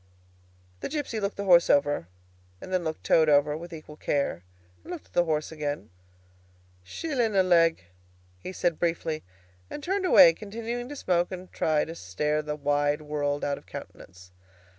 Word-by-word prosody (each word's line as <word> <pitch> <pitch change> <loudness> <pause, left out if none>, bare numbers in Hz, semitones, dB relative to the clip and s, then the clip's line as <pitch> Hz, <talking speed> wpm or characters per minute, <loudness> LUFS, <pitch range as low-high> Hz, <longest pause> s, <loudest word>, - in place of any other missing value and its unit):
The - - -4
gipsy 290 -7 -3
looked 200 -1 -3
the 200 - -2
horse 175 -3 +5
over, 145 - +2 0.5
and 185 - -8
then 185 - +2
he - - -8
looked 160 0 -4
Toad 160 -1 +4
over 145 0 +4
with 170 +3 -8
equal 155 -2 -10
care, 140 - -1 0.4
and - - -9
looked 350 -4 -7
at - - -28
the 175 - +3
horse 155 -1 -1
again. 145 - -4 0.9
"Shillin' 240 - -2
a 190 - +5
leg," 165 - +3 0.6
he 135 - -7
said 175 -3 -1
briefly, 165 -2 -1 0.5
and 295 - -7
turned 380 +2 0
away, 165 - +8
continuing 230 +5 -5
to 290 - -6
smoke 180 -9 0
and 185 0 -8
try 155 -2 +1
to 165 - -7
stare 150 - -1
the 150 0 -4
wide 145 +1 0
world 145 -1 -2
out 140 -1 -1
of - - -25
countenance. 90 +1 -11
165 Hz, 175 wpm, -27 LUFS, 150-190 Hz, 0.9 s, away